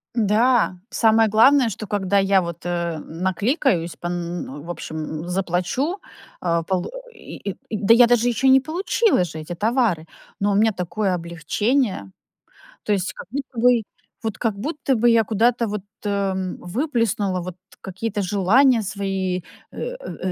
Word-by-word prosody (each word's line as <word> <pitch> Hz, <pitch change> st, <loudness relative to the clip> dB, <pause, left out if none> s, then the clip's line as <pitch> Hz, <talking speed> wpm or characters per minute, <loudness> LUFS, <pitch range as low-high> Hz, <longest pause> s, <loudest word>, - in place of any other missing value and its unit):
Да, 225 Hz, -1 st, +3 dB
самое 225 Hz, -1 st, +4 dB
главное, 245 Hz, +3 st, +5 dB
что 215 Hz, +1 st, -6 dB
когда 200 Hz, 0 st, +1 dB
я 195 Hz, -1 st, +3 dB
вот, 170 Hz, 0 st, -7 dB
эм, 170 Hz, -1 st, -4 dB
наликаюсь 190 Hz, -, 0 dB
пон 175 Hz, 0 st, -4 dB
н 170 Hz, -5 st, -5 dB
в 170 Hz, -, -9 dB
общем, 155 Hz, -1 st, -5 dB
заплачу, 185 Hz, -, -1 dB, 0.4 s
э, 170 Hz, -1 st, +1 dB
полу 185 Hz, -2 st, -1 dB, 0.2 s
и, 205 Hz, -, -7 dB
э, -, -, -15 dB, 0.2 s
да 215 Hz, +1 st, +4 dB
я 240 Hz, +1 st, +7 dB
даже 240 Hz, 0 st, +3 dB
ещё 245 Hz, +3 st, +1 dB
не 265 Hz, 0 st, +7 dB
получила 350 Hz, -, +1 dB
же 160 Hz, -2 st, -7 dB
эти 155 Hz, +3 st, -6 dB
товары, 210 Hz, -4 st, +1 dB, 0.3 s
но 205 Hz, +1 st, +1 dB
у -, -, +1 dB
меня 220 Hz, +2 st, +3 dB
такое 190 Hz, +1 st, -1 dB
облегчение. 170 Hz, -, -1 dB, 0.7 s
То 210 Hz, -, +1 dB
есть 190 Hz, -2 st, -1 dB
как -, -, -10 dB
будто 270 Hz, -1 st, -6 dB
бы, 245 Hz, 0 st, +4 dB, 0.4 s
вот 220 Hz, -3 st, -3 dB
как 225 Hz, -4 st, -1 dB
будто 275 Hz, +4 st, -1 dB
бы 240 Hz, +1 st, +3 dB
я 230 Hz, -1 st, +5 dB
куда-то 230 Hz, +2 st, +1 dB
вот, 210 Hz, -1 st, -3 dB, 0.2 s
эм, 195 Hz, -3 st, -1 dB
выплеснула, 210 Hz, -, -1 dB
вот 180 Hz, 0 st, -7 dB, 0.3 s
какие-то 205 Hz, +3 st, -3 dB
желания 215 Hz, +6 st, +4 dB
свои, 195 Hz, -2 st, -2 dB, 0.3 s
э, -, -, -14 dB, 0.2 s
э, 190 Hz, -, -5 dB
200 Hz, 155 wpm, -22 LUFS, 180-235 Hz, 0.7 s, я